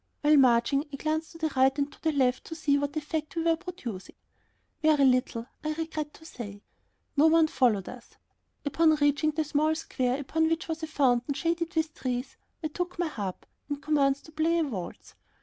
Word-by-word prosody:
While 300 0 +5
marching 255 +1 +4
I - - -5
glanced 315 +3 -2
to - - -11
the 320 -1 -1
right 265 +1 +4
and 285 0 -1
to - - -19
the 320 - +1
left 260 -3 +1
to 325 - -7
see 295 -3 +2
what 285 +1 -1
effect 310 +1 -3
we 330 - 0
were 330 0 +3
producing. 330 - -7 0.7
Very 305 -3 +4
little, 250 -2 +2 0.2
I 310 0 -1
regret 310 -2 -4
to 320 - -16
say. 205 -8 -8 0.5
No 300 +2 +6
one 325 0 +5
followed 235 -10 +2
us. 250 -1 -11 0.5
Upon 315 +2 +4
reaching 290 +1 +2
the 310 +1 0
small 305 +1 +1
square 255 -4 -1
upon 320 +3 +1
which 330 +2 -1
was 320 0 -3
a 315 - -3
fountain 270 -3 +1
shaded 335 +2 -1
with 315 -1 0
trees, 250 0 -3 0.3
I 310 - -1
took 355 +4 -4
my 345 -2 0
harp 200 -9 -5 0.2
and 290 -1 -2
commenced 280 -2 +1
to 315 - -13
play 320 +2 +1
a 330 - +2
waltz. 210 - -6
300 Hz, 200 wpm, -28 LUFS, 265-320 Hz, 0.7 s, No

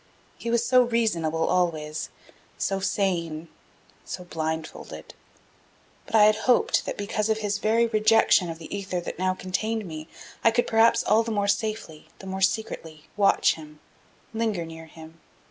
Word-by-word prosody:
He 235 - -4
was 235 0 +1
so 255 +1 +5
reasonable 175 -10 0
always, 155 -4 -1 0.5
so 195 -1 -1
sane 175 -5 -1 0.5
so 180 - -7
blindfolded. 160 -2 -5 0.9
But - - -3
I 215 - +7
had 215 0 +5
hoped 245 - +3
that - - -4
because 210 +1 -2
of 220 - +2
his 205 -2 -2
very 225 +3 +3
rejection 215 -4 +4
of 165 - -5
the 165 +4 -7
ether 195 -2 -3
that 175 - -7
now 185 0 +1
contained 215 +4 -2
me 155 -2 -7 0.4
I - - +7
could 235 +2 +1
perhaps 225 +1 +4
all 220 +1 +4
the 230 - -4
more 205 -2 0
safely, 215 -6 -2
the - - -12
more 190 0 -5
secretly, 165 -6 -2
watch 200 -1 +4
him, 150 -1 -12 0.5
linger 220 -6 -1
near 160 0 -10
him. 160 +1 -14
195 Hz, 160 wpm, -25 LUFS, 165-220 Hz, 0.9 s, I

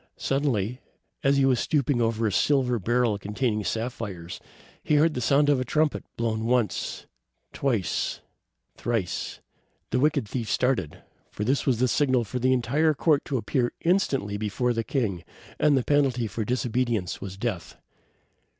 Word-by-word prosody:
Suddenly, 130 -4 -1 0.4
as 140 +1 +3
he 135 - +4
was 130 -3 +3
stooping 140 -4 +1
over 115 0 +1
a 105 - +1
silver 125 +2 +2
barrel 115 +1 +1
containing 105 +2 -1
sapphires, 100 -7 -4 0.4
he 150 - +2
heard 155 +2 +4
the 125 - -3
sound 140 +5 +3
of 145 -3 +3
a - - 0
trumpet, 150 +4 0
blown 110 -1 -1
once, 120 -6 0 0.5
twice, 115 - -1 0.6
thrice. 115 -7 -3 0.5
The 125 - +2
wicked 145 -4 +2
thief 115 0 -4
started, 125 - 0 0.3
for 105 - -5
it 135 +6 0
was 130 -4 +3
the 130 +2 +2
signal 130 -2 +2
for 125 +4 -4
the 130 +1 +2
entire 140 +6 +2
court 150 -1 +2
to 135 - -1
appear 120 +2 0
instantly 135 - +1
before 110 +4 0
the 115 -1 -1
king, 105 - -2 0.4
and 145 -2 +4
the 130 - +1
penalty 135 -4 +2
of 110 +1 -3
disobedience 120 -5 -1
was 95 -1 -7
death. 100 -6 -4
125 Hz, 155 wpm, -26 LUFS, 110-135 Hz, 0.6 s, he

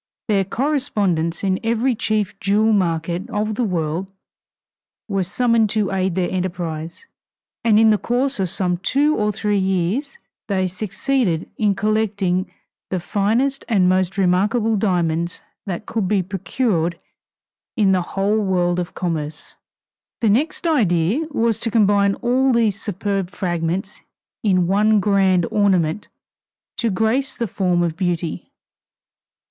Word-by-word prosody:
Their 200 -3 +2
correspondents 205 - 0
in 190 -1 +1
every 235 +3 +1
chief 215 -3 -1
jewel 215 +3 +2
market 175 +1 -1
of 215 -1 -1
the 245 - -1
world 175 -2 -2 1.0
were 195 -3 0
summoned 230 +3 +2
to 210 -3 +1
aid 190 -2 0
their 185 -2 0
enterprise, 170 - -4 0.6
and 220 -2 +4
in 220 0 +6
the 210 - +2
course 255 +1 -1
of 190 -2 0
some 180 0 -1
two 285 - +1
or 210 0 +1
three 210 0 0
years 190 - -1 0.3
they 190 -2 0
succeeded 195 - -1
in 205 -2 +1
collecting 200 -3 0 0.4
the 185 - -1
finest 225 +10 0
and 195 -5 +3
most 185 +1 +1
remarkable 210 +5 +2
diamonds 170 -4 0 0.2
that 190 +2 -4
could 220 -4 -2
be 195 -1 +1
procured 185 -2 -1 0.8
in 205 -3 +4
the 185 -1 +2
whole 195 +4 0
world 180 -3 +1
of 175 -1 -5
commerce. 155 -4 -4 0.7
The 225 - +3
next 280 - 0
idea 225 - +2
was 230 -6 0
to 230 - -2
combine 200 -3 +3
all 260 +2 +3
these 220 -4 +1
superb 195 -2 -2
fragments 180 +1 -3 0.4
in 185 -4 +2
one 210 +3 +3
grand 190 -3 +3
ornament 190 -3 +1 0.7
to 230 - 0
grace 225 +7 0
the 235 - -1
form 180 -2 0
of 165 -2 -1
beauty. 175 -3 -3
195 Hz, 135 wpm, -20 LUFS, 180-220 Hz, 1.0 s, in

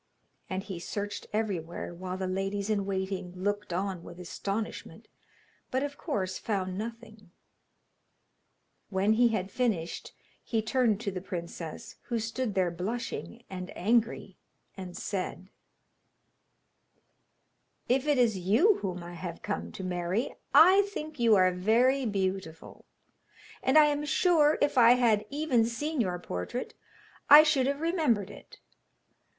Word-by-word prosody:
And 190 0 -3
he 190 -4 -6
searched 205 +3 -5
everywhere, 185 -7 -3
while 185 +1 -5
the 190 - -3
ladies 195 +2 -2
in 200 -2 0
waiting 190 -2 -3
looked 205 +2 -2
on 185 0 -2
with 175 - -11
astonishment, 200 +4 -5 0.6
but 260 +2 0
of 285 0 -4
course 185 -8 -3
found 190 -4 -2
nothing. 220 -1 -8 1.6
When 195 +2 +2
he 240 +2 +5
had 200 -4 -2
finished 200 -10 -2 0.3
he 225 - -1
turned 225 -2 +2
to 200 - -2
the 185 -1 -5
princess, 170 -3 -7
who 235 - -2
stood 225 -1 -3
there 185 -2 +2
blushing 230 +5 -5
and 185 -1 -7
angry, 225 +4 0 0.4
and 185 -2 -8
said: 190 -1 -4 2.4
'If 265 +3 +1
it 295 -2 +3
is 225 -6 +2
you 230 - +3
whom 180 -3 -4
I 175 +1 -8
have 170 0 -7
come 205 - -3
to 190 - -7
marry, 180 +5 -2 0.2
I 370 +5 +8
think 310 -8 -7
you 230 -2 +5
are 185 -1 +4
very 235 +8 +2
beautiful, 190 -5 -4 0.8
and 265 +4 +3
I 305 - +9
am 295 0 0
sure 310 -1 +3
if 290 -3 +2
I 235 0 +8
had 230 -4 +2
even 285 -5 +1
seen 275 +6 -2
your 180 -4 -1
portrait 175 - -5 0.6
I 295 +2 +11
should 290 -4 +2
have 280 +1 -1
remembered 310 - +1
it. - - -14
205 Hz, 135 wpm, -29 LUFS, 185-245 Hz, 2.4 s, I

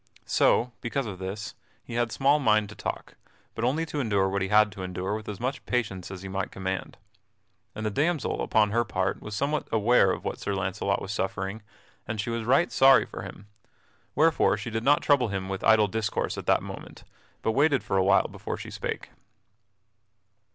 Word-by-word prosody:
So, 125 +1 +3
because 135 +3 -2
of 100 -4 -6
this, 100 +2 -5 0.3
he - - -9
had 120 -1 0
small 140 +4 +3
mind 110 -5 +3
to 105 - -10
talk, - - -6 0.4
but 115 - -5
only 145 +7 +1
to 150 -2 -4
endure 100 -7 +1
what 100 0 -1
he 95 - 0
had 105 +1 +4
to 95 0 -9
endure 90 +2 -3
with 110 0 -5
as 105 - -6
much 130 +3 -3
patience 100 -7 -2
as 95 -1 -8
he - - -6
might 95 +1 -3
command. 95 0 -4 0.8
And 110 +1 -4
the 105 - 0
damsel 155 +6 0
upon 105 -2 +2
her 120 +2 +2
part 95 -3 -2
was 105 -1 -6
somewhat 145 +6 -1
aware 110 -2 +4
of - - -5
what - - -3
Sir 100 - -2
Launcelot 100 +1 -1
was 95 - -5
suffering 95 +1 -3 0.5
and 110 0 -4
she 115 +3 -2
was 115 -1 -3
right 135 +8 +3
sorry 135 0 +6
for - - -8
him, 100 - -9 0.7
wherefore 160 0 +3
she 115 - -6
did 110 +1 -2
not 145 +3 +4
trouble 140 -5 +3
him 95 -2 -3
with 95 -1 -4
idle 110 -1 +5
discourse 110 +1 -2
at - - -7
that - - +3
moment, - - -9 0.4
but 110 - +2
waited 140 -1 +3
for 100 - -2
a 95 - +4
while 95 - +4
before - - -6
she - - -8
spake. - - -5
110 Hz, 200 wpm, -27 LUFS, 95-125 Hz, 0.8 s, sorry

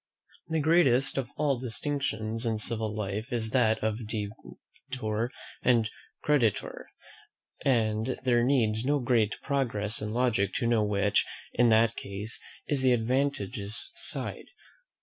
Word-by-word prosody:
The 160 0 0
greatest 145 -5 +4
of 125 -3 -4
all 145 -4 +1
distinctions 115 -3 -1
in 115 -2 0
civil 110 0 0
life 105 +2 -4
is 115 -2 +1
that 110 -4 +2
of 110 0 -2
debtor 110 +2 -5 0.3
and 115 -3 +3 0.3
creditor; 130 -8 0 0.8
and 115 -1 +1
there 120 -2 +3
needs 115 -4 +2
no 145 +3 +2
great 115 -5 +1
progress 115 -7 0
in 105 0 -3
logic 110 -5 +1
to - - 0
know 115 -2 +3
which, 100 -1 +2 0.3
in 120 0 +4
that 115 +1 +4
case, 100 +3 -6 0.3
is 145 -3 +1
the 130 -1 +4
advantageous 120 -3 -1
side. - - -4
115 Hz, 130 wpm, -28 LUFS, 110-130 Hz, 0.8 s, greatest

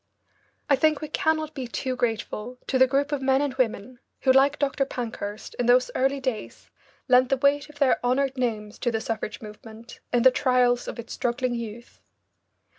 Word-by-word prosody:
I 285 - +5
think 305 +2 +2
we 305 - -6
cannot 315 0 0
be 260 -4 -5
too 255 +2 -3
grateful 230 0 -3
to 260 - 0
the 260 - +7
group 280 +2 0
of 290 -2 -1
men 265 0 +3
and 285 -2 -1
women 250 -1 -2 0.2
who, 260 - +4
like 275 +2 +4
Dr. 280 -1 0
Pankhurst, 225 -5 -6
in 245 - 0
those 250 +1 +4
early 270 +2 +1
days 255 -5 -5 0.4
lent 255 -1 +5
the 270 - +2
weight 285 +2 +2
of 300 - -15
their 275 -4 +2
honoured 265 +2 +1
names 220 -4 -3
to 245 - 0
the 225 -1 -1
suffrage 220 -1 -4
movement 220 +2 -12
in 245 -1 +2
the 260 - +8
trials 250 -2 +2
of - - -6
its 235 - -7
struggling 245 +1 -1
youth. 235 0 -7
255 Hz, 190 wpm, -25 LUFS, 235-275 Hz, 0.4 s, the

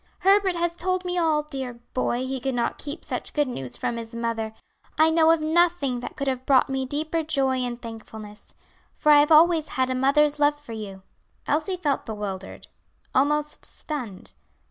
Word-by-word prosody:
"Herbert 390 -1 +4
has 340 0 -1
told 370 +1 -1
me 360 0 -2
all. 315 -3 +2
Dear 265 -4 -5 0.2
boy, 255 0 -1
he 265 0 -3
could 265 +1 -2
not 235 -1 -1
keep 290 +3 -6
such - - -4
good 295 -2 +2
news 135 - -5
from 235 - -2
his 230 0 -8
mother. 225 -1 -3 0.4
I 315 +1 +5
know 320 0 +5
of 325 -1 +4
nothing 315 -5 +2
that 240 - -7
could 280 - -2
have 260 -1 -1
brought 265 -1 +3
me 265 -1 -1
deeper 310 +4 -1
joy 275 -4 +1
and 245 -1 -3
thankfulness, 220 -2 -10 0.4
for 300 - +3
I 295 - +8
have 295 +2 +3
always 320 0 +5
had 260 0 +1
a - - +1
mother's 290 +3 +3
love 295 0 +3
for 290 -6 -10
you." 195 -3 -8 0.4
Elsie 320 +6 0
felt 290 -8 -1
bewildered, 205 -3 -6 0.5
almost 300 +2 +1
stunned. 245 - -6
280 Hz, 185 wpm, -25 LUFS, 240-315 Hz, 0.5 s, I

